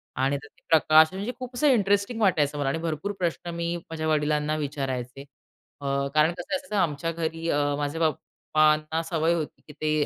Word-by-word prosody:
आणि 135 +2 +1
त्यात 145 +1 -12
हे - - -44
प्रकाश 160 +1 +6
म्हणजे 200 +6 -3
खूप 255 -1 -7
असं 295 +4 +2
इंटरेस्टिंग 205 -1 +2
वाटायचं 150 -7 +2
मला 140 -2 0
आणि 160 - -1
भरपूर 165 +4 -3
प्रश्न 175 0 -2
मी 170 0 -2 0.2
माझ्या 155 -1 -3
वडिलांना 150 0 +1
विचारायचे. 135 -3 -4 0.6
अ, - - -7 0.3
कारण 155 +2 +5
कसं 175 +10 -4
असायचा 275 -6 -5
ना, 200 - +3
आमच्या 165 0 -2
घरी 165 0 -3
अ, 145 - +2 0.2
माझ्या 145 +3 -2
पप्पांना 155 +1 0
सवय 165 0 +1
होती, 160 -3 -4
की 150 - -11
ते 155 -1 0
155 Hz, 185 wpm, -26 LUFS, 150-170 Hz, 0.6 s, प्रकाश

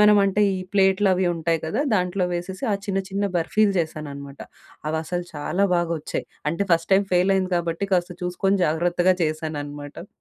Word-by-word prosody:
మనం 210 0 +7
అంటే 195 +2 +2 0.2
ఈ - - -5
ప్లేట్లవి 190 -1 +3
ఉంటాయి 165 0 0
కదా! 165 - -1
దాంట్లో 180 0 +1
వేసేసి 185 +7 -5
ఆ - - +3
చిన్న, 195 -1 0
చిన్న 200 +1 -1
బర్ఫీలు 200 +4 +2
చేశాననమాట. 140 -3 -6 0.5
అవసలు 170 +3 -3
చాలా 180 +7 0
బాగొచ్చాయి. 170 -3 -2 0.2
అంటే 170 +5 -1
ఫస్ట్ 165 +2 +1
టైమ్ 195 0 +3
ఫెయిలయింది 185 +1 +2
కాబట్టి 170 +3 -2
కాస్త 180 0 0
చూసుకొని 195 +2 +1
జాగ్రత్తగా 175 +3 +2
చేశాననమాట. 150 0 -5
175 Hz, 145 wpm, -23 LUFS, 160-195 Hz, 0.5 s, మనం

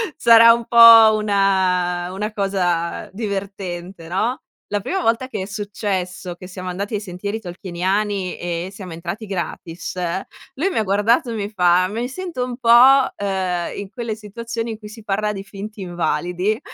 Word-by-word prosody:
sarà 230 0 +7
un 235 0 -3
po' 230 -2 +9
una 190 -4 +1
una 210 +3 -3
cosa 180 -5 -1
divertente, 195 -4 -5
no? 215 +9 -1 0.3
La 205 - +1
prima 375 - -2
volta 230 -1 +1
che 260 - -5
è - - -5
successo 195 -3 -4
che 185 - -11
siamo 185 0 -7
andati 200 +4 -4
ai 205 - -2
sentieri 200 +2 -5
tolkieniani 190 +1 -2
e 175 +1 -4
siamo 190 -4 -9
entrati 175 +6 -6
gratis, 175 -3 -5 0.6
lui 330 +9 0
mi - - -3
ha - - +1
guardato 220 +7 +2
e - - -3
mi 205 -2 -3
fa: 180 -3 +3
"Mi 230 +4 -3
sento 330 -1 -5
un 245 -1 -6
po', 240 -3 -2 0.5
uhm, 185 -3 -2
in 200 -1 -6
quelle 235 -3 -4
situazioni 230 +2 -5
in 220 - -6
cui 210 - -10
si 220 +1 -12
parla 210 +1 -1
di 195 -1 -6
finti 205 +1 -9
invalidi". 180 +3 -1
200 Hz, 165 wpm, -20 LUFS, 180-220 Hz, 0.6 s, po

